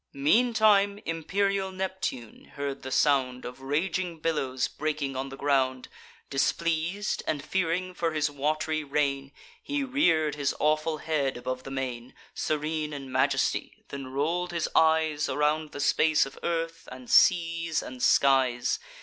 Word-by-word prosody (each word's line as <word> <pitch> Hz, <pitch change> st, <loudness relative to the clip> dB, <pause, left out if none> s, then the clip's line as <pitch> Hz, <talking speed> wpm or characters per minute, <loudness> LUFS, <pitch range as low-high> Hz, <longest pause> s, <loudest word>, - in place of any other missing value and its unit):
Meantime 205 Hz, -, +3 dB
imperial 190 Hz, +4 st, -1 dB
Neptune 185 Hz, -, -5 dB
heard 140 Hz, -1 st, -4 dB
the 130 Hz, -, -6 dB
sound 130 Hz, -2 st, +2 dB
Of 125 Hz, +2 st, -8 dB
raging 165 Hz, +5 st, -1 dB
billows 135 Hz, -6 st, -1 dB
breaking 150 Hz, -3 st, -3 dB
on 135 Hz, +1 st, -3 dB
the 135 Hz, -, -9 dB
ground. 130 Hz, -3 st, 0 dB, 0.4 s
Displeas'd, 170 Hz, +7 st, 0 dB
and 145 Hz, -1 st, -2 dB
fearing 185 Hz, +1 st, -1 dB
for 170 Hz, -2 st, -1 dB
his 155 Hz, -1 st, +1 dB
wat'ry 155 Hz, +2 st, -1 dB
reign, 140 Hz, -1 st, -1 dB, 0.3 s
He 285 Hz, -1 st, -2 dB
rear'd 170 Hz, -, +2 dB
his 145 Hz, -1 st, -1 dB
awful 155 Hz, +1 st, +1 dB
head 150 Hz, -5 st, -1 dB
above 130 Hz, +1 st, -4 dB
the 135 Hz, -, -9 dB
main, 130 Hz, -2 st, -5 dB, 0.2 s
Serene 155 Hz, 0 st, -2 dB
in 135 Hz, -2 st, -7 dB
majesty; 135 Hz, +1 st, 0 dB
then 140 Hz, -1 st, -6 dB
roll'd 165 Hz, +7 st, -1 dB
his 170 Hz, -2 st, -1 dB
eyes 160 Hz, -2 st, +3 dB
Around 150 Hz, +2 st, 0 dB
the -, -, -7 dB
space 155 Hz, +1 st, +3 dB
of 135 Hz, -, -11 dB
earth, 165 Hz, -1 st, -3 dB
and 130 Hz, -1 st, -10 dB
seas, 165 Hz, 0 st, +3 dB
and 125 Hz, -1 st, -8 dB
skies. 130 Hz, -3 st, +3 dB
150 Hz, 140 wpm, -27 LUFS, 135-165 Hz, 0.4 s, Meantime